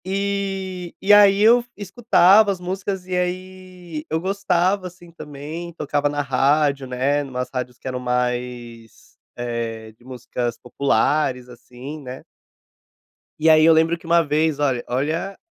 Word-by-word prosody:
E 195 -2 -3
e 205 +2 +4
aí, 200 -1 +6
eu 230 +3 +6
f 240 - -19
escutava 205 -1 +4
as 190 - -5
músicas, 190 +1 -4
e 185 0 -3
aí 180 -2 -5
eu 160 - 0
gostava, 190 0 0
assim, 175 -1 -15
também, 155 +2 -8
tocava 145 -2 -1
na 145 0 -2
rádio, 140 +1 +1
né, 135 +3 0
numas 125 -2 -5
rádios 125 -1 -4
que - - -10
eram 125 -1 -3
mais, 125 -2 -4 0.2
eh, 115 -2 -5
de 110 +2 -26
músicas 120 -2 -5
populares, 135 0 0
assim, 125 +5 -10
né. 130 -1 -9 1.2
E 160 +1 +3
aí 155 0 +6
eu 165 - +7
lembro 160 +1 +2
que 165 - -19
uma 170 +1 +4
vez, 150 0 0
olha 130 -4 0
olha, 155 +10 -2
155 Hz, 145 wpm, -21 LUFS, 125-185 Hz, 1.2 s, eu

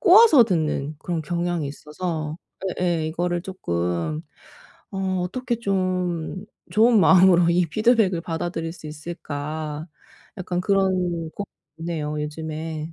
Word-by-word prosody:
꼬아서 395 - +8
듣는 155 -6 -1
그런 170 -2 -3
경향이 170 -2 -1
있어서 155 +1 -4 0.4
예예. 170 -3 +1
이거를 175 +1 -1
쪼끔 85 - -2 0.7
'어 190 -1 -1
어떻게 245 +3 -2
좀 185 -4 -1 0.3
좋은 225 0 +5
마음으로 180 -1 +6
이 175 0 +3
피드백을 215 -2 +3
받아들일 165 0 -3
수 155 - -11
있을까?' 155 -1 -5 0.5
약간 180 -1 -2
그런 195 0 +2
고민이 175 -2 -1 0.5
있네요 150 -3 -3
요즘에. 155 +1 -5
170 Hz, 265 characters per minute, -24 LUFS, 155-185 Hz, 0.7 s, 꼬아서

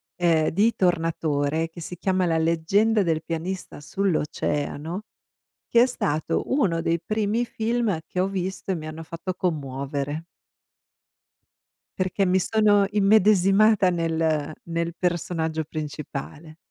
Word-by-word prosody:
ehm, 165 -3 +2
di 210 +7 +2
Tornatore 160 -3 0
che 165 - -12
si 175 +2 -7
chiama 185 +1 +1
"La 165 -2 +1
leggenda 195 +7 +2
del 160 -3 0
pianista 170 0 -5
sull'oceano", 155 0 -2 0.7
che 235 - +5
è - - +5
stato 155 - -1
uno 190 - +2
dei 165 0 0
primi 215 +2 0
film 225 -5 -1
che 180 - -3
ho 190 - +2
visto 190 0 -4
e - - -1
mi 155 -1 -7
hanno 155 +1 -7
fatto 170 +3 -5
commuovere. 145 -2 -3 1.7
Perché 190 +1 +1
mi 185 +1 +3
sono 205 +1 +3
immedesimata 205 0 +4
nel 160 -3 0
nel 170 0 -2
personaggio 165 -3 -1
principale. 150 0 -7
170 Hz, 120 wpm, -24 LUFS, 160-195 Hz, 1.7 s, che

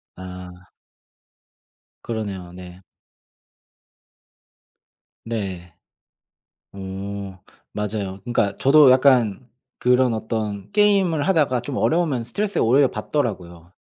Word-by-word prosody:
아. 90 -1 -11 1.3
그러네요. 100 -6 -5
네. 90 0 -11 2.4
네. 95 -6 -5 1.0
오. 95 0 -7 0.4
맞아요. 100 -2 -4
그니까 110 -5 0
저도 145 +1 +6
약간 125 -3 +3 0.3
그런 125 0 +3
어떤 110 - -4
게임을 195 -7 +2
하다가 150 -9 +2
좀 140 +1 -6
어려우면 155 -8 +1
스트레스가 205 - -1
오히려 130 +4 +4
받더라고요. 95 - -4
110 Hz, 200 characters per minute, -22 LUFS, 95-135 Hz, 2.4 s, 저도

